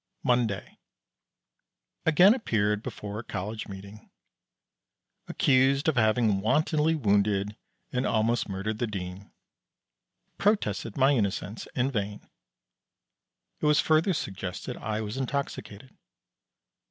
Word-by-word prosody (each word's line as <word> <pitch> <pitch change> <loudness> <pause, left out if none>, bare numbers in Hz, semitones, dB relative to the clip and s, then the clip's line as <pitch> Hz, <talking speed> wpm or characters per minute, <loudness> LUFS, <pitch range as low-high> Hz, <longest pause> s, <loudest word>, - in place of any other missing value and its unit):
Monday. 120 -6 0 1.3
Again 180 +6 +7
appeared 105 - 0
before 105 -1 -6
a - - -6
College 105 +2 -5
meeting. 100 +2 -10 1.2
Accused 135 +2 +3
of 160 - +3
having 110 -3 +3
wantonly 155 +6 +2
wounded, 105 -4 +1 0.4
and 125 +1 0
almost 115 +1 +1
murdered 100 +3 -3
the 120 - 0
Dean. 95 -1 -6 1.1
Protested 115 - 0
my 135 +1 +5
innocence 105 -3 -1
in 130 +2 +1
vain. 105 -3 -4 1.3
It - - +1
was 150 +1 +4
further 160 +4 +3
suggested 95 - -4
I 110 0 -3
was 110 +3 -5
intoxicated. 130 -3 -4
110 Hz, 105 wpm, -28 LUFS, 100-135 Hz, 1.3 s, Again